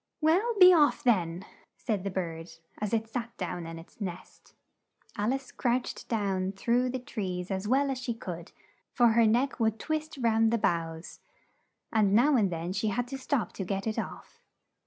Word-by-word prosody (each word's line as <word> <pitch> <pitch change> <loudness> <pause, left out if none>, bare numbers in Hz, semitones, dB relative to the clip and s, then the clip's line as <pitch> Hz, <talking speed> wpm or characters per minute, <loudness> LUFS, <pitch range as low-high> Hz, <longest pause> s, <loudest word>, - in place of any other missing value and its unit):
"Well, 370 +10 +2
be 365 0 +10
off, 300 -4 +4
then!" 180 -7 +1 0.3
said 210 -5 -2
the 200 - -2
bird 170 -3 -4 0.3
as 210 -1 -2
it 225 -1 0
sat 235 0 -5
down 175 -2 -4
in 165 0 -7
its 165 +6 -14
nest. 180 -3 -8 0.6
Al 210 +4 0
ice 270 -1 -4
crouched 245 +1 -2
down 195 -4 -1
through 240 +5 +1
the 260 - -2
trees 190 -7 -4
as 190 +1 -2
well 275 +3 +2
as 260 - -3
she 240 -2 -3
could, 175 -6 -7 0.4
for 240 -2 +4
her 225 0 +4
neck 245 +6 +1
would 220 -1 +1
twist 310 +2 -3
round 225 -2 +3
the 235 - +2
boughs, 165 -4 -2 0.7
and 205 -3 +3
now 275 +6 +5
and 205 -6 +2
then 170 +2 -3
she 205 +3 -1
had 245 +4 -1
to 270 - -4
stop 260 -2 -1
to 195 - -4
get 195 +1 -3
it 220 -1 -1
off. - - -8
220 Hz, 185 wpm, -29 LUFS, 185-250 Hz, 0.7 s, be